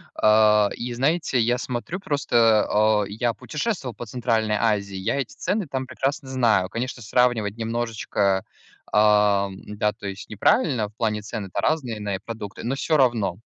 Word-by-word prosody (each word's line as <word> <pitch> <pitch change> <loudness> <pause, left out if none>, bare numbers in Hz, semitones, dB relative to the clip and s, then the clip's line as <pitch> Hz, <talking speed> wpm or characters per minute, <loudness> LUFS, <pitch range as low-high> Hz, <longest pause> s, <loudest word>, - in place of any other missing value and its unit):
а, 105 -1 +5
и, 120 0 -5
знаете, 140 +2 +1
я 120 +2 +2
смотрю 125 +9 -4
просто, 115 - +2
а, 105 0 +3
я 115 +3 -1
путешествовал 150 - -4
по 120 - -7
Центральной 115 -2 0
Азии, 100 -4 0
я 105 +7 -1
эти 135 - -4
цены 205 -4 -2
там 130 -1 -4
прекрасно 135 +2 -3
знаю. 115 -8 +2
Конечно, 120 +4 -4
сравнивать 115 -2 +1
немножечко, 110 -4 -1 0.5
а, 105 -2 +4
м-да, 105 +2 -3
то - - -12
есть, 100 0 -7
неправильно, 110 - +2
в 105 - -27
плане 105 -2 -1
цены-то 105 -3 -5
разные 130 -9 -1
на 100 -1 -2
э, - - -5
продукты, 110 -4 -7
но 125 +4 -1
всё 155 +2 +1
равно. 115 -9 +2
115 Hz, 160 wpm, -24 LUFS, 105-125 Hz, 0.5 s, а